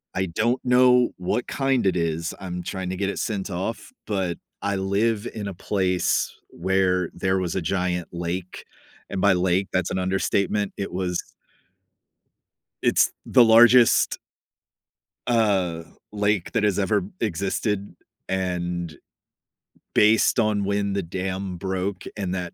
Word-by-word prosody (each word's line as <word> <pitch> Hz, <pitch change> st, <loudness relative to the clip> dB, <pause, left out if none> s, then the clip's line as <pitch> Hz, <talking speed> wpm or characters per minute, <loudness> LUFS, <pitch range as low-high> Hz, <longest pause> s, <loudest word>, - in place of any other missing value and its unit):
I 95 Hz, 0 st, 0 dB
don't 115 Hz, +9 st, 0 dB
know 125 Hz, 0 st, +5 dB
what 90 Hz, +7 st, -1 dB
kind 135 Hz, -5 st, 0 dB
it 95 Hz, -, +2 dB
is. 85 Hz, 0 st, -1 dB
I'm 90 Hz, -2 st, -5 dB
trying 95 Hz, 0 st, -4 dB
to 95 Hz, -, -3 dB
get 100 Hz, +1 st, -1 dB
it -, -, -4 dB
sent 100 Hz, -3 st, -3 dB
off, 95 Hz, +6 st, -4 dB, 0.2 s
but 95 Hz, -5 st, -1 dB, 0.2 s
I 100 Hz, -1 st, -1 dB
live 100 Hz, +3 st, 0 dB
in 105 Hz, -2 st, -4 dB
a -, -, -6 dB
place 90 Hz, 0 st, 0 dB, 0.2 s
where 90 Hz, 0 st, +1 dB
there 95 Hz, +2 st, 0 dB
was 90 Hz, -2 st, -2 dB
a 95 Hz, -, 0 dB
giant 90 Hz, 0 st, -1 dB
lake. 85 Hz, +1 st, -4 dB, 0.5 s
And 100 Hz, -, -3 dB
by 100 Hz, 0 st, +4 dB
lake, 90 Hz, +1 st, +1 dB
that's 90 Hz, -1 st, 0 dB
an 95 Hz, -, -1 dB
understatement. 95 Hz, +2 st, 0 dB
It 100 Hz, -, -4 dB
was 90 Hz, -1 st, -1 dB, 1.6 s
It's -, -, +3 dB
the 125 Hz, -, +6 dB
largest 120 Hz, +1 st, +6 dB, 1.1 s
uh, 100 Hz, -8 st, +1 dB, 0.3 s
lake 105 Hz, -3 st, 0 dB
that 115 Hz, -3 st, 0 dB
has 105 Hz, -3 st, +2 dB
ever 100 Hz, -, +1 dB, 0.2 s
existed. 100 Hz, +1 st, -2 dB, 0.3 s
And 90 Hz, -3 st, -2 dB, 1.0 s
based 105 Hz, +3 st, +4 dB
on 105 Hz, -3 st, +1 dB
when 100 Hz, 0 st, 0 dB
the 100 Hz, -, 0 dB
dam 95 Hz, +2 st, -4 dB
broke 95 Hz, +1 st, -3 dB
and 95 Hz, -2 st, -2 dB
that 90 Hz, -2 st, -4 dB
95 Hz, 140 wpm, -24 LUFS, 90-105 Hz, 1.6 s, the